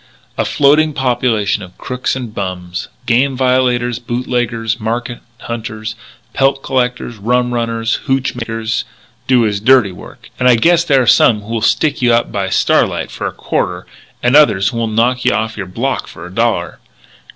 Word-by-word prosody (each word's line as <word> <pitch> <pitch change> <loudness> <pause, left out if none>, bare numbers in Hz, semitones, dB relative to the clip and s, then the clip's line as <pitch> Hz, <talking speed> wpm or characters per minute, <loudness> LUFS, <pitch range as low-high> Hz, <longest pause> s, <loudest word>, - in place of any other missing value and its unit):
A - - -1
floating 150 +2 +3
population 120 -6 0
of 90 -1 -12
crooks 125 +1 -3
and 120 -5 -6
bums 90 -3 -5 0.2
game 130 +3 +2
violators, 125 -2 +1
boot 120 +1 -4
leggers, 115 -2 -1
market 120 +2 -3 0.2
hunters, 110 -2 -5 0.4
pelt 135 0 +1
'collectors,' 125 -2 -1
rum 125 +4 0
runners, 115 -1 -1
hootch 135 -1 0
makers, 115 -2 -3 0.4
do 125 -3 +4
his 105 -2 0
dirty 125 -2 +4
work 90 - -13
and 125 0 +4
I 125 - +6
guess 170 +8 +3
there 140 -6 +3
are - - -2
some 110 -1 +4
who'll 115 +1 -3
stick 150 +7 +1
you 120 -1 +3
up 120 - 0
by 100 -2 -2
starlight - - +1
for - - -4
a - - -3
quarter - - -3 0.4
and 125 +3 +3
others 100 -10 +5
who'll 115 0 -2
knock 120 +4 +1
your 110 -2 -1
block 120 +9 -2
off - - -14
for - - -10
a - - -11
dollar.... - - -1
120 Hz, 165 wpm, -15 LUFS, 110-130 Hz, 0.4 s, I